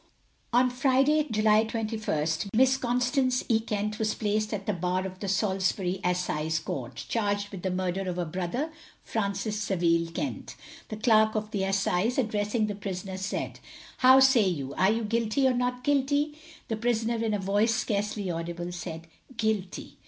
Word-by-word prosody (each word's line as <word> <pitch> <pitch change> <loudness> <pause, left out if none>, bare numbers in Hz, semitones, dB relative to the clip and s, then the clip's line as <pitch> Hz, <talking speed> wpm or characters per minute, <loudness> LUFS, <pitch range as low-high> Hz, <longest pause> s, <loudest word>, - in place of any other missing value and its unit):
On 250 +1 +4
Friday, 275 +4 +3
July 215 -1 +4
21st, 215 -8 -2
Miss 260 +2 +5
Constance 250 +1 +1
E. 225 -2 +4
Kent 210 -1 -3
was 215 -1 0
placed 215 0 -1
at 200 -2 -3
the 210 - 0
Bar 180 +1 -1
of 185 -1 -7
the 200 - -4
Salisbury 190 -1 0
Assize 160 -3 0
Court, 135 -6 -5
charged 205 -2 -1
with 195 -3 -8
the 190 - -1
murder 185 +1 -2
of 180 - -3
her 175 -1 -2
brother, 185 - -3 0.3
Francis 210 0 -2
Saville 170 -4 +1
Kent. - - -4 0.3
The 215 - -5
Clerk 220 -1 +4
of 215 0 -2
the 195 -2 -1
Assize, 195 +3 +1
addressing 215 -2 0
the 210 - -3
prisoner, 190 -1 -5
said: 190 0 -4 0.4
How 260 -1 +8
say 265 -6 +5
you, 140 -6 -3
are 190 +5 +3
you 225 +2 +1
guilty 230 +4 +1
or 260 - +3
not 250 0 -1
guilty? 285 +2 +1 0.3
The 225 - -2
prisoner 230 0 0
in 220 -2 +1
a - - -2
voice 205 +4 +2
scarcly 205 -3 -1
audible, 170 +1 -4
said 165 -2 -6 0.3
Guilty. 215 -5 -2
210 Hz, 165 wpm, -28 LUFS, 185-230 Hz, 0.4 s, How